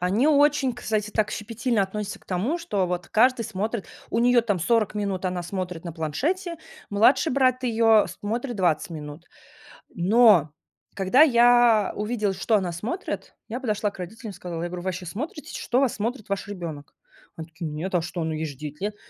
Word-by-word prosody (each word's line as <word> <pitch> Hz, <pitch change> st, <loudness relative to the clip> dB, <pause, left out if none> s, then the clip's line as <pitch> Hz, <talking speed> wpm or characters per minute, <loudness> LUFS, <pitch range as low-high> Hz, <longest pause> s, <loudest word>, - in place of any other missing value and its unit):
они 195 Hz, +9 st, +2 dB
очень, 290 Hz, -3 st, +3 dB
кстати, 215 Hz, -3 st, -2 dB
так 215 Hz, -1 st, 0 dB
щепетильно 230 Hz, 0 st, -1 dB
относятся 205 Hz, +1 st, -4 dB
к -, -, -25 dB
тому, 210 Hz, -, -1 dB
что 205 Hz, -, -1 dB
вот 180 Hz, 0 st, -3 dB
каждый 240 Hz, +1 st, +3 dB
смотрит. 215 Hz, +1 st, -3 dB, 0.2 s
У -, -, 0 dB
нее, 245 Hz, +1 st, +5 dB
там, 210 Hz, -5 st, -1 dB
40 220 Hz, +2 st, +1 dB
минут 200 Hz, -3 st, -2 dB
она 180 Hz, -1 st, -1 dB
смотрит 180 Hz, -1 st, -5 dB
на 170 Hz, -, -5 dB
планшете. 310 Hz, -, -2 dB, 0.3 s
Младший 230 Hz, +9 st, +4 dB
брат 255 Hz, -1 st, +2 dB
ее 225 Hz, -2 st, +4 dB
смотрит 235 Hz, +4 st, -3 dB
20 175 Hz, -4 st, +1 dB
минут. 150 Hz, +1 st, -8 dB, 0.7 s
Но, 185 Hz, -4 st, +5 dB, 0.4 s
когда 195 Hz, +8 st, +3 dB
я 240 Hz, -6 st, +5 dB
увидела, 210 Hz, -1 st, -1 dB
что 220 Hz, +4 st, +1 dB
она 185 Hz, -4 st, 0 dB
смотрит, 215 Hz, -, -5 dB
я 235 Hz, +3 st, -3 dB
подошла 210 Hz, -5 st, -1 dB
к -, -, -16 dB
родителям 215 Hz, +5 st, -7 dB
и -, -, -11 dB
сказала, 170 Hz, -2 st, -5 dB
я 175 Hz, -, -3 dB
говорю: 180 Hz, 0 st, -6 dB
"Вы -, -, -5 dB
вообще 185 Hz, 0 st, -3 dB
смотрите, 285 Hz, -, -6 dB
что 245 Hz, -, +1 dB
вас 265 Hz, -, +2 dB
смотрит 220 Hz, +1 st, -4 dB
ваш 200 Hz, 0 st, -2 dB
ребенок?" 170 Hz, -7 st, -7 dB, 0.4 s
Они 160 Hz, -1 st, -7 dB
такие: 160 Hz, 0 st, -6 dB
"Нет, 160 Hz, +6 st, -5 dB
а 175 Hz, -, +3 dB
что, 170 Hz, 0 st, -4 dB
ну, 160 Hz, 0 st, -2 dB
ей 155 Hz, +1 st, -3 dB
же 145 Hz, -, -6 dB
9 150 Hz, +3 st, -8 dB
лет". 210 Hz, +1 st, -2 dB
210 Hz, 190 wpm, -25 LUFS, 180-240 Hz, 0.7 s, нее